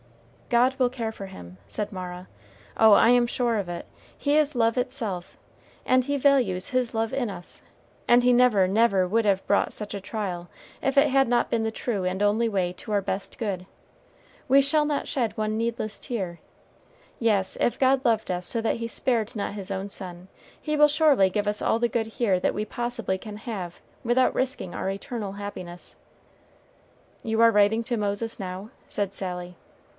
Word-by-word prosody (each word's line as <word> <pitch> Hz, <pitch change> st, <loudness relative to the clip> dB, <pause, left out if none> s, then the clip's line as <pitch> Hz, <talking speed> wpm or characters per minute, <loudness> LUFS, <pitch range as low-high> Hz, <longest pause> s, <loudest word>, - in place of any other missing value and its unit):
"God 250 Hz, +2 st, +3 dB
will 250 Hz, -1 st, +4 dB
care 235 Hz, -3 st, -4 dB
for 195 Hz, -2 st, -8 dB
him," 90 Hz, -, -11 dB
said 205 Hz, -, -4 dB
Mara; 180 Hz, 0 st, -7 dB, 0.5 s
"oh, 220 Hz, -1 st, +6 dB
I 225 Hz, -, +6 dB
am 245 Hz, 0 st, +5 dB
sure 240 Hz, -2 st, 0 dB
of 195 Hz, -4 st, -3 dB
it; 175 Hz, -1 st, -5 dB, 0.3 s
He 285 Hz, 0 st, +1 dB
is 300 Hz, -2 st, +3 dB
love 230 Hz, 0 st, +2 dB
itself, 225 Hz, -8 st, -3 dB, 0.5 s
and 255 Hz, 0 st, +4 dB
He 285 Hz, +2 st, -1 dB
values 255 Hz, -10 st, +2 dB
his 255 Hz, -2 st, 0 dB
love 225 Hz, +2 st, -1 dB
in 260 Hz, -4 st, -1 dB
us, 175 Hz, -3 st, -8 dB, 0.5 s
and 240 Hz, +1 st, +5 dB
He 250 Hz, 0 st, +5 dB
never, 240 Hz, -6 st, +5 dB
never 195 Hz, -2 st, +3 dB
would 225 Hz, +5 st, +2 dB
have 195 Hz, -2 st, +1 dB
brought 200 Hz, -, +2 dB
such 210 Hz, -1 st, -5 dB
a 200 Hz, -, -5 dB
trial, 185 Hz, -4 st, -4 dB, 0.3 s
if 270 Hz, +1 st, -1 dB
it 280 Hz, +2 st, +7 dB
had 270 Hz, -2 st, +3 dB
not 240 Hz, -1 st, +2 dB
been 230 Hz, -1 st, +1 dB
the 220 Hz, -, -1 dB
true 220 Hz, -4 st, -2 dB
and 185 Hz, +2 st, -2 dB
only 215 Hz, +3 st, +2 dB
way 185 Hz, -4 st, 0 dB
to 195 Hz, -, -9 dB
our 205 Hz, -, +3 dB
best 195 Hz, 0 st, -4 dB
good. 195 Hz, -5 st, -3 dB, 0.8 s
We 275 Hz, +2 st, +7 dB
shall 300 Hz, +2 st, +2 dB
not 295 Hz, -1 st, -1 dB
shed 235 Hz, -5 st, -1 dB
one 215 Hz, 0 st, -1 dB
needless 225 Hz, -2 st, -2 dB
tear. 190 Hz, -8 st, -4 dB, 0.8 s
Yes, 205 Hz, -5 st, +1 dB
if 240 Hz, -, +1 dB
God 265 Hz, 0 st, +3 dB
loved 225 Hz, -4 st, +1 dB
us 180 Hz, 0 st, -2 dB
so 230 Hz, -, -1 dB
that 225 Hz, +1 st, 0 dB
he 230 Hz, 0 st, -4 dB
spared 230 Hz, -2 st, -1 dB
not 205 Hz, -1 st, -3 dB
his 200 Hz, -1 st, -6 dB
own 195 Hz, +1 st, -3 dB
Son, 180 Hz, -2 st, -8 dB, 0.3 s
he 305 Hz, -1 st, -2 dB
will 300 Hz, 0 st, +6 dB
surely 290 Hz, -10 st, +4 dB
give 205 Hz, +2 st, -1 dB
us 210 Hz, 0 st, -1 dB
all 225 Hz, -, +1 dB
the 240 Hz, -, +2 dB
good 225 Hz, -1 st, -1 dB
here 220 Hz, -4 st, +1 dB
that -, -, 0 dB
we 210 Hz, -, -2 dB
possibly 240 Hz, -5 st, -3 dB
can 210 Hz, +1 st, -8 dB
have 200 Hz, -7 st, -6 dB, 0.2 s
without 245 Hz, +2 st, +2 dB
risking 260 Hz, -9 st, -2 dB
our -, -, -2 dB
eternal 200 Hz, 0 st, -5 dB
happiness." 185 Hz, -4 st, -7 dB, 1.3 s
"You 225 Hz, 0 st, -1 dB
are 230 Hz, 0 st, +7 dB
writing 210 Hz, +2 st, +3 dB
to 240 Hz, -1 st, -1 dB
Moses, 210 Hz, +2 st, -2 dB
now?" 190 Hz, +2 st, -6 dB, 0.2 s
said 200 Hz, -2 st, -2 dB
Sally. 180 Hz, -2 st, -5 dB
220 Hz, 190 wpm, -26 LUFS, 195-245 Hz, 1.3 s, it